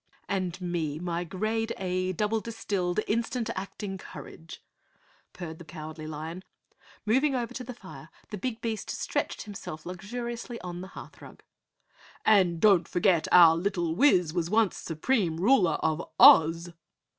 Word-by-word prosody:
"And 185 Hz, -3 st, -2 dB
me, 170 Hz, -5 st, -2 dB
my 170 Hz, +1 st, -3 dB
grade 215 Hz, +6 st, -2 dB
A, 185 Hz, 0 st, -1 dB
double 210 Hz, +4 st, 0 dB
distilled, 205 Hz, -4 st, -2 dB
instant 230 Hz, +2 st, -1 dB
acting 195 Hz, 0 st, -6 dB
courage," 165 Hz, -3 st, -11 dB, 0.7 s
purred 160 Hz, -3 st, -8 dB
the -, -, -9 dB
Cowardly 155 Hz, -1 st, -8 dB
Lion. 160 Hz, +4 st, -6 dB, 0.6 s
Moving 265 Hz, +6 st, +2 dB
over 240 Hz, -2 st, -3 dB
to 255 Hz, -, -5 dB
the 250 Hz, 0 st, -8 dB
fire, -, -, -12 dB, 0.2 s
the 210 Hz, -, -4 dB
big 240 Hz, +1 st, -4 dB
beast 225 Hz, -2 st, -3 dB
stretched -, -, -3 dB
himself 195 Hz, -7 st, -8 dB
luxuriously 235 Hz, +6 st, -6 dB
on 175 Hz, -1 st, -6 dB
the 190 Hz, -, -7 dB
hearth -, -, -11 dB
rug. -, -, -13 dB, 0.8 s
"And 185 Hz, -6 st, +4 dB
don't 190 Hz, -3 st, +4 dB
forget 175 Hz, -2 st, +2 dB
our 170 Hz, -2 st, +8 dB
little 175 Hz, -2 st, -1 dB
Wiz 180 Hz, -, +3 dB
was 170 Hz, -2 st, -1 dB
once 215 Hz, -1 st, +2 dB
Supreme 170 Hz, +1 st, -1 dB
Ruler 185 Hz, -, +3 dB
of 160 Hz, +1 st, +1 dB, 0.2 s
Oz!" 165 Hz, +2 st, +7 dB
185 Hz, 145 wpm, -28 LUFS, 170-220 Hz, 0.8 s, our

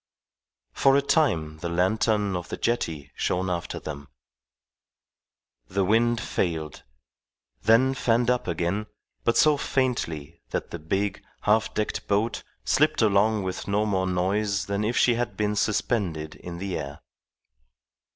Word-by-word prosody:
For 135 Hz, 0 st, +4 dB
a -, -, +4 dB
time 80 Hz, -, +1 dB
the 85 Hz, -, -3 dB
lantern 100 Hz, +3 st, +1 dB
on 90 Hz, -, -2 dB
the -, -, -4 dB
jetty 80 Hz, -, -2 dB
shone 90 Hz, +1 st, -1 dB
after 85 Hz, -1 st, -3 dB
them. 70 Hz, -2 st, -7 dB, 1.6 s
The 95 Hz, +5 st, 0 dB
wind 115 Hz, +3 st, +3 dB
failed, 80 Hz, -8 st, -2 dB, 0.8 s
then 125 Hz, -, +4 dB
fanned 120 Hz, -2 st, +1 dB
up 125 Hz, -, -1 dB
again, 90 Hz, +5 st, -1 dB, 0.4 s
but 115 Hz, -, +2 dB
so 150 Hz, -1 st, +5 dB
faintly 85 Hz, -, -2 dB
that -, -, -3 dB
the 85 Hz, -, -5 dB
big, 95 Hz, +6 st, -1 dB, 0.2 s
half 110 Hz, +1 st, +2 dB
decked 105 Hz, -, -2 dB
boat 105 Hz, +3 st, 0 dB, 0.2 s
slipped 155 Hz, -4 st, +3 dB
along 105 Hz, 0 st, +3 dB
with 95 Hz, -1 st, -4 dB
no 105 Hz, +2 st, +1 dB
more 95 Hz, -3 st, 0 dB
noise 95 Hz, +2 st, 0 dB
than 100 Hz, +1 st, -1 dB
if 115 Hz, +3 st, 0 dB
she 120 Hz, -, +5 dB
had 120 Hz, +1 st, -2 dB
been 105 Hz, 0 st, 0 dB
suspended 95 Hz, -7 st, 0 dB
in 85 Hz, -1 st, -8 dB
the 95 Hz, -1 st, -3 dB
air. 70 Hz, -1 st, -7 dB
100 Hz, 140 wpm, -26 LUFS, 85-115 Hz, 1.6 s, so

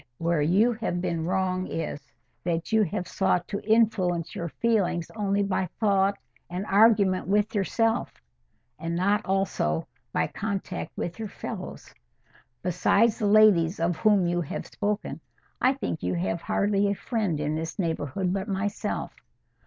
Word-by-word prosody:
—Where 165 Hz, -2 st, +1 dB
you 200 Hz, +11 st, +3 dB
have 220 Hz, -6 st, -2 dB
been 170 Hz, -3 st, -2 dB
wrong 185 Hz, 0 st, 0 dB
is—that 165 Hz, -, -5 dB
you 220 Hz, 0 st, +4 dB
have 185 Hz, -1 st, -1 dB
sought 180 Hz, -3 st, +1 dB
to 200 Hz, -1 st, -3 dB
influence 205 Hz, -7 st, +2 dB
your 170 Hz, -, -4 dB
feelings 180 Hz, -, 0 dB
only 200 Hz, -1 st, +1 dB
by 190 Hz, -1 st, 0 dB
thought 200 Hz, -2 st, +2 dB, 0.3 s
and 180 Hz, +3 st, -4 dB
argument 200 Hz, -3 st, +4 dB
with 210 Hz, +2 st, +2 dB
yourself—and 135 Hz, -, -3 dB
not 200 Hz, +4 st, +2 dB
also 190 Hz, -, 0 dB, 0.3 s
by -, -, +1 dB
contact 195 Hz, -3 st, -4 dB
with 175 Hz, +5 st, -4 dB
your 220 Hz, -, -3 dB
fellows. -, -, -7 dB, 0.7 s
Besides 205 Hz, +6 st, +2 dB
the 210 Hz, -, +1 dB
ladies 200 Hz, -5 st, +5 dB
of 170 Hz, 0 st, 0 dB
whom 205 Hz, -1 st, +4 dB
you 175 Hz, 0 st, +1 dB
have 160 Hz, -, -5 dB
spoken, 210 Hz, 0 st, -3 dB, 0.4 s
I 255 Hz, +2 st, +4 dB
think 265 Hz, -11 st, -4 dB
you -, -, -1 dB
have 170 Hz, -1 st, -1 dB
hardly 200 Hz, +2 st, +1 dB
a 200 Hz, -, 0 dB
friend 205 Hz, -9 st, -1 dB
in 150 Hz, 0 st, -1 dB
this 160 Hz, +1 st, -4 dB
neighbourhood 170 Hz, 0 st, -1 dB
but 195 Hz, +1 st, -2 dB
myself. 200 Hz, 0 st, -2 dB
190 Hz, 145 wpm, -26 LUFS, 170-210 Hz, 0.7 s, ladies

